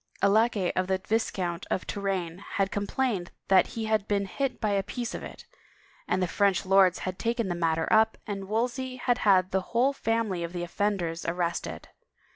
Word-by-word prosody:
A -, -, +7 dB
laquay 215 Hz, -2 st, +3 dB
of 185 Hz, 0 st, 0 dB
the 190 Hz, 0 st, +1 dB
Viscount 185 Hz, -4 st, -2 dB
de -, -, +2 dB
Touraine. 190 Hz, -2 st, -3 dB
had 195 Hz, -1 st, +1 dB
complained 205 Hz, -2 st, -1 dB, 0.2 s
that 190 Hz, -1 st, +6 dB
he 225 Hz, -, -1 dB
had 215 Hz, -2 st, +1 dB
been 200 Hz, -1 st, +1 dB
hit 265 Hz, +7 st, -2 dB
by 215 Hz, -, 0 dB
a 200 Hz, -1 st, +2 dB
piece 240 Hz, +4 st, -5 dB
of -, -, -5 dB
it, -, -, -10 dB, 0.6 s
and 185 Hz, -, +1 dB
the -, -, +1 dB
French 195 Hz, +1 st, +2 dB
lords 190 Hz, -1 st, +5 dB
had 185 Hz, 0 st, -4 dB
taken 230 Hz, -3 st, -1 dB
the -, -, 0 dB
matter 165 Hz, -2 st, 0 dB
up 220 Hz, 0 st, +4 dB
and 195 Hz, -2 st, -5 dB
Wolsey 250 Hz, +4 st, -1 dB
had 245 Hz, -1 st, 0 dB
had 190 Hz, -2 st, +4 dB
the 190 Hz, -, +1 dB
whole 245 Hz, +8 st, +1 dB
family 225 Hz, -7 st, -1 dB
6f 170 Hz, +1 st, -4 dB
the 175 Hz, -1 st, -3 dB
offenders 175 Hz, -2 st, -1 dB
arrested. 170 Hz, 0 st, -2 dB
195 Hz, 190 wpm, -28 LUFS, 185-225 Hz, 0.6 s, A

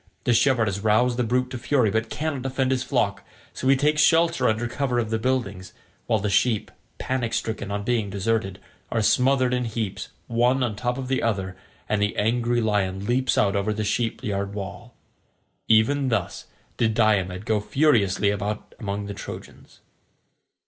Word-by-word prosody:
The 120 Hz, -, +2 dB
shepherd 120 Hz, -1 st, +3 dB
has 100 Hz, -1 st, -2 dB
roused 110 Hz, +4 st, +2 dB
the 125 Hz, -, +1 dB
brute 125 Hz, +2 st, 0 dB
to 125 Hz, -, -5 dB
fury 125 Hz, -4 st, +2 dB
but 110 Hz, +2 st, -1 dB
cannot 150 Hz, -3 st, -3 dB
defend 130 Hz, 0 st, -1 dB
his 130 Hz, -1 st, +1 dB
flock, -, -, -1 dB, 0.3 s
so 130 Hz, -, -3 dB
he 135 Hz, -, +6 dB
takes 150 Hz, +3 st, +2 dB
shelter 165 Hz, -4 st, +3 dB
under 110 Hz, +2 st, -1 dB
cover 125 Hz, 0 st, -1 dB
of 115 Hz, -2 st, -1 dB
the 110 Hz, -, 0 dB
buildings, 100 Hz, -7 st, -2 dB, 0.3 s
while 115 Hz, -, +2 dB
the 105 Hz, 0 st, -2 dB
sheep, 105 Hz, +2 st, +1 dB, 0.3 s
panic 125 Hz, -3 st, -2 dB
stricken 110 Hz, -3 st, -3 dB
on 100 Hz, 0 st, -3 dB
being 115 Hz, -3 st, 0 dB
deserted, 100 Hz, -1 st, -1 dB, 0.3 s
are 110 Hz, -, +1 dB
smothered 130 Hz, +2 st, +3 dB
in 125 Hz, -1 st, 0 dB
heaps 110 Hz, -3 st, -4 dB, 0.2 s
one 120 Hz, +4 st, +2 dB
on 115 Hz, -4 st, -1 dB
top 125 Hz, +3 st, -2 dB
of 130 Hz, -1 st, -5 dB
the 130 Hz, 0 st, 0 dB
other, 95 Hz, -5 st, -1 dB, 0.3 s
and 105 Hz, -1 st, 0 dB
the 105 Hz, 0 st, 0 dB
angry 120 Hz, +2 st, +1 dB
lion 100 Hz, -3 st, 0 dB
leaps 130 Hz, +3 st, +1 dB
out 100 Hz, 0 st, +2 dB
over 100 Hz, +2 st, 0 dB
the 105 Hz, 0 st, -2 dB
sheep 110 Hz, +2 st, -1 dB
yard 100 Hz, -1 st, -3 dB
wall. 100 Hz, -2 st, -7 dB, 0.7 s
Even 130 Hz, +5 st, +3 dB
thus 110 Hz, -6 st, -2 dB, 0.3 s
did 110 Hz, -2 st, +1 dB
Diomed 100 Hz, -4 st, +1 dB
go 110 Hz, -2 st, +1 dB
furiously 105 Hz, -5 st, +2 dB
about 105 Hz, +1 st, -4 dB
among 100 Hz, -1 st, -3 dB
the 100 Hz, -, -5 dB
Trojans. 100 Hz, -, -10 dB
115 Hz, 175 wpm, -24 LUFS, 105-125 Hz, 0.7 s, he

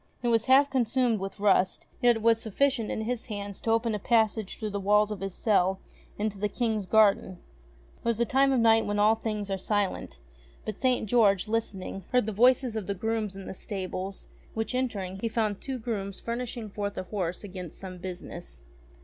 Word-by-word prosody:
It 240 Hz, -, +2 dB
was 230 Hz, -1 st, +2 dB
half 275 Hz, +2 st, +6 dB
consumed 245 Hz, -3 st, +2 dB
with 195 Hz, +1 st, -6 dB
rust, 190 Hz, -2 st, +2 dB, 0.2 s
yet 240 Hz, -1 st, +5 dB
it 225 Hz, -, -4 dB
was 230 Hz, 0 st, +4 dB
sufficient 235 Hz, +1 st, +1 dB
in -, -, -2 dB
his 235 Hz, +1 st, -3 dB
hands 205 Hz, -3 st, -6 dB
to -, -, -3 dB
open 225 Hz, 0 st, +2 dB
a 210 Hz, -, -2 dB
passage 220 Hz, -2 st, +1 dB
through 215 Hz, -2 st, -4 dB
the 200 Hz, -, -2 dB
walls 210 Hz, +2 st, +3 dB
of 210 Hz, -, -4 dB
his 195 Hz, -1 st, -5 dB
cell 190 Hz, -3 st, +2 dB, 0.4 s
into 205 Hz, -1 st, -2 dB
the 210 Hz, +1 st, 0 dB
King's 220 Hz, -4 st, -1 dB
garden. 200 Hz, -3 st, +3 dB, 0.6 s
It -, -, -28 dB
was 235 Hz, -2 st, +1 dB
the 235 Hz, -, +2 dB
time 270 Hz, +3 st, +3 dB
of 260 Hz, -, +3 dB
night 225 Hz, -1 st, +4 dB
when 205 Hz, 0 st, -1 dB
all 210 Hz, +1 st, +5 dB
things 215 Hz, -3 st, -3 dB
are 195 Hz, -, -1 dB
silent; 205 Hz, -, -1 dB, 0.5 s
but 215 Hz, -, -5 dB
St. 255 Hz, -3 st, +2 dB
George, 205 Hz, -4 st, +3 dB
listening, 195 Hz, -4 st, -3 dB
heard 250 Hz, -3 st, +3 dB
the 220 Hz, -, -2 dB
voices 245 Hz, +2 st, +4 dB
of 215 Hz, -4 st, -3 dB
grooms 220 Hz, -2 st, -1 dB
in 195 Hz, -1 st, -8 dB
the -, -, -6 dB
stables; 190 Hz, -1 st, -5 dB, 0.3 s
which, 225 Hz, +3 st, -2 dB
entering, 200 Hz, -7 st, -2 dB
he 230 Hz, -, -1 dB
found 215 Hz, -3 st, -1 dB
two 265 Hz, -1 st, -4 dB
grooms 205 Hz, -5 st, -4 dB
furnishing 235 Hz, 0 st, -4 dB
lo -, -, -6 dB
ENGLISH 205 Hz, -, -12 dB
FAIRY 205 Hz, -1 st, -2 dB
TALES -, -, -4 dB
forth -, -, -25 dB
a -, -, -24 dB
horse 185 Hz, -3 st, -2 dB
against 185 Hz, -4 st, -8 dB
some 185 Hz, -2 st, -8 dB
business. 175 Hz, -, -8 dB
215 Hz, 210 wpm, -28 LUFS, 195-230 Hz, 0.6 s, half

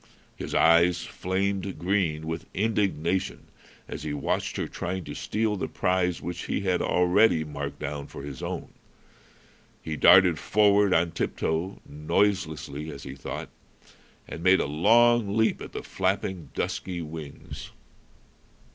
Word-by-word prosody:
His -, -, -5 dB
eyes 85 Hz, +1 st, +5 dB
flamed 95 Hz, 0 st, -2 dB
green 85 Hz, -3 st, 0 dB
with 80 Hz, 0 st, -5 dB
indignation 95 Hz, -4 st, 0 dB, 0.4 s
as -, -, -6 dB
he 75 Hz, -, -4 dB
watched 70 Hz, -, -2 dB
her -, -, -2 dB
trying 95 Hz, +1 st, -4 dB
to -, -, -7 dB
steal 110 Hz, -1 st, -1 dB
the 95 Hz, -, -3 dB
prize 90 Hz, -1 st, 0 dB
which 85 Hz, +1 st, -5 dB
he -, -, -1 dB
had 95 Hz, -2 st, +1 dB
already 90 Hz, -1 st, +3 dB
marked 75 Hz, -2 st, -5 dB
down 70 Hz, 0 st, -5 dB
for 70 Hz, -, -9 dB
his 70 Hz, -3 st, -7 dB
own. -, -, -4 dB, 1.1 s
He 80 Hz, -, -3 dB
darted 90 Hz, 0 st, +6 dB
forward 105 Hz, +1 st, +4 dB
on 85 Hz, -1 st, +3 dB
tip 85 Hz, -, -3 dB
toe 85 Hz, +5 st, -2 dB
noiselessly, 80 Hz, -1 st, -1 dB
as 70 Hz, -1 st, -9 dB
he 65 Hz, -, -7 dB
thought 70 Hz, -, -6 dB, 0.8 s
and 75 Hz, -, -7 dB
made 95 Hz, +2 st, +5 dB
a -, -, +1 dB
long 110 Hz, +7 st, +4 dB
leap 110 Hz, 0 st, +2 dB
at -, -, -8 dB
the -, -, -6 dB
flapping, 95 Hz, -4 st, -2 dB
dusky 90 Hz, -2 st, -3 dB
wings. 75 Hz, -2 st, -8 dB
90 Hz, 140 wpm, -27 LUFS, 80-100 Hz, 1.1 s, darted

